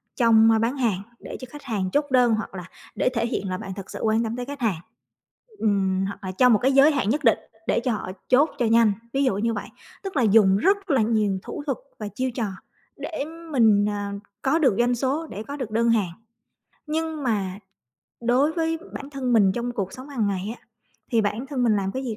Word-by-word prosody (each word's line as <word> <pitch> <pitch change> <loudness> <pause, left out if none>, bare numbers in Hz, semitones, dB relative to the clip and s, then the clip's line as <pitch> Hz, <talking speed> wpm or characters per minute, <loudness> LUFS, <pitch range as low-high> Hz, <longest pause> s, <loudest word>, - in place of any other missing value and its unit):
trong 225 -2 +5
bán 245 +5 0
hàng 220 -7 0 0.2
để - - -8
cho 255 - -7
khách 295 +1 -11
hàng 205 -8 -2
chốt 290 0 +2
đơn 245 -3 +4
hoặc 215 -2 -5
là 180 -2 -6 0.3
để - - +2
thể 230 -2 -1
hiện 195 -4 -3
là 185 - -2
bạn 190 +1 -6
thật 195 -1 -8
sự - - -6
quan 220 +1 +2
tâm 225 0 -3
tới 250 0 -4
khách 285 +1 -7
hàng, 215 -9 0 0.8
ừm, 195 -2 +1
hoặc 200 +1 -6
là 185 - -3
trong 250 +5 +5
một 210 - +4
cái 265 +2 +3
giới 275 +3 +6
hạn 265 -8 0
nhất 300 +5 0
định 230 - +4 0.3
để - - +2
cho 245 +1 -1
họ 205 -4 -3 0.2
chốt 280 +5 +5
cho 240 - +1
nhanh, 225 -1 +5 0.2
ví 275 +1 +2
dụ 255 -8 +2
như 230 +2 0
vậy. 205 - -5 0.4
Tức 385 -4 -6
là - - +3
dùng 200 -3 +5
rất 390 - +1
là 265 -4 +4
nhiều 215 -3 +1
thủ 295 - -6
thuật 275 -4 -1 0.2
và 210 - -4
chiêu 255 +4 -3
trò, 235 -2 -2 0.5
để 315 -4 -4 0.3
mình, 220 -6 +4
à, 205 -1 -3 0.3
có 290 +5 +2
được 260 -10 +3
doanh 245 +1 +3
số, 280 +6 -1
để 210 -4 -7
có 285 +3 -7
được 250 -6 -5
đơn 230 +1 +2
hàng. 210 -6 +2 0.8
Nhưng 315 -1 -2
mà 200 -5 -1 0.6
đối 250 +6 +2
với 325 -1 -1
bản 280 +1 -7
thân 265 -3 -2
mình 200 -5 +5
trong 240 +3 -3
cuộc 195 -5 -3
sống 260 +2 -10
hàng 245 -7 -1
ngày 200 +3 -2
á, - - -32 0.5
thì 230 - +4
bản 215 +5 -2
thân 270 -3 -2
mình 225 -3 +3
làm 195 -1 -1
cái 260 +1 -4
gì 225 -4 -3
235 Hz, 235 wpm, -24 LUFS, 205-270 Hz, 0.8 s, giới